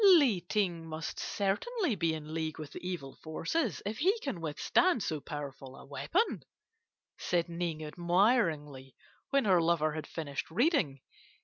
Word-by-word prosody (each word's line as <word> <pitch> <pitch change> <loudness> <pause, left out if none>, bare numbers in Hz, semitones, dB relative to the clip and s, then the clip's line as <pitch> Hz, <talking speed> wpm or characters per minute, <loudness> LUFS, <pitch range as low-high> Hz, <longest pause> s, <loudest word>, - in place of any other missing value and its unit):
"'Li 290 - +7
Ting 180 -6 +1
must 155 0 -5
certainly 280 - 0
be 165 -5 +1
in 155 0 -7
league 160 -1 -2
with 155 -3 -7
the - - -7
evil 175 -7 -4
forces 190 - -2
if 215 +2 -3
he 385 +8 +3
can 230 - -3
withstand 205 - +2
so 160 -6 -1
powerful 140 -3 -7
a - - -12
weapon,' 340 - 0 0.8
said 175 -1 +1
Ning 170 -2 -3
admiringly, 165 - +1 0.3
when 275 -3 +3
her 185 -4 +5
lover 165 -2 +2
had 155 0 -5
finished 145 -4 -4
reading. 185 - +2
170 Hz, 145 wpm, -32 LUFS, 155-220 Hz, 0.8 s, Li